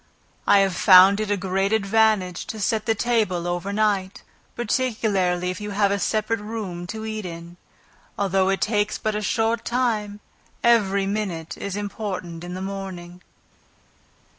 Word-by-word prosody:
I -, -, +6 dB
have 195 Hz, -2 st, +1 dB
found 190 Hz, +2 st, +7 dB
it 215 Hz, -1 st, -2 dB
a 205 Hz, -, +1 dB
great 195 Hz, +1 st, -1 dB
advantage 215 Hz, -3 st, +1 dB
to 220 Hz, -, -6 dB
set 215 Hz, +2 st, -1 dB
the 225 Hz, -, +2 dB
table 210 Hz, -7 st, 0 dB
over 175 Hz, +3 st, -2 dB
night, 200 Hz, -2 st, 0 dB, 0.3 s
particularly 210 Hz, -7 st, 0 dB
if 185 Hz, -, -7 dB
you 210 Hz, -, -5 dB
have 200 Hz, -1 st, +3 dB
a 200 Hz, -, 0 dB
separate 215 Hz, +2 st, 0 dB
room 205 Hz, -5 st, -6 dB
to 220 Hz, +3 st, -6 dB
eat 215 Hz, -1 st, -4 dB
in; 170 Hz, -1 st, -8 dB, 0.6 s
although 190 Hz, -1 st, +1 dB
it 195 Hz, -, 0 dB
takes 210 Hz, -1 st, 0 dB
but 215 Hz, -, -2 dB
a 210 Hz, -, -2 dB
short 225 Hz, +2 st, 0 dB
time, 220 Hz, -5 st, -1 dB, 0.4 s
every 200 Hz, -5 st, +3 dB
minute 195 Hz, -6 st, -3 dB
is 200 Hz, -1 st, -5 dB
important 195 Hz, -5 st, -5 dB
in 175 Hz, +1 st, -6 dB
the 185 Hz, -, -5 dB
morning. 185 Hz, -2 st, -7 dB
200 Hz, 155 wpm, -23 LUFS, 185-215 Hz, 0.6 s, found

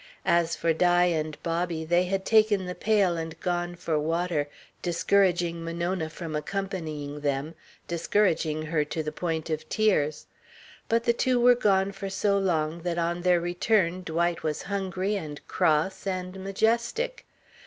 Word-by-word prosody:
As 170 Hz, -1 st, +2 dB
for 165 Hz, -1 st, +1 dB
Di 175 Hz, +2 st, +4 dB
and 155 Hz, -3 st, -1 dB
Bobby, 170 Hz, -1 st, -1 dB
they 175 Hz, +2 st, +3 dB
had 190 Hz, +1 st, -2 dB
taken 215 Hz, -3 st, +4 dB
the 180 Hz, -, -4 dB
pail 200 Hz, -4 st, +2 dB
and 165 Hz, 0 st, -5 dB
gone 175 Hz, -1 st, -2 dB
for 165 Hz, -3 st, -1 dB
water, 165 Hz, -1 st, -1 dB, 0.3 s
discouraging 175 Hz, -1 st, +1 dB
Monona 170 Hz, 0 st, -2 dB
from 160 Hz, -1 st, -6 dB
accompanying 155 Hz, -4 st, -4 dB
them, 145 Hz, +2 st, -2 dB, 0.3 s
discouraging 170 Hz, -3 st, +1 dB
her 155 Hz, -1 st, 0 dB
to 155 Hz, +2 st, -4 dB
the 150 Hz, -, -3 dB
point 160 Hz, 0 st, -3 dB
of 155 Hz, 0 st, -3 dB
tears. 170 Hz, -9 st, +1 dB, 0.6 s
But 230 Hz, 0 st, +2 dB
the 235 Hz, -, +3 dB
two 250 Hz, +1 st, +1 dB
were 245 Hz, +1 st, +7 dB
gone 200 Hz, -4 st, +2 dB
for 195 Hz, 0 st, -6 dB
so 200 Hz, +1 st, +1 dB
long 165 Hz, -3 st, 0 dB
that 175 Hz, 0 st, -2 dB
on 170 Hz, +1 st, -1 dB
their 180 Hz, -1 st, +4 dB
return 175 Hz, +1 st, +1 dB
Dwight 170 Hz, 0 st, -1 dB
was 155 Hz, -1 st, -2 dB
hungry 195 Hz, 0 st, -2 dB
and 150 Hz, -5 st, -6 dB
cross 160 Hz, +6 st, +1 dB
and 185 Hz, 0 st, -4 dB
majestic. 235 Hz, -, 0 dB
175 Hz, 155 wpm, -27 LUFS, 160-195 Hz, 0.6 s, were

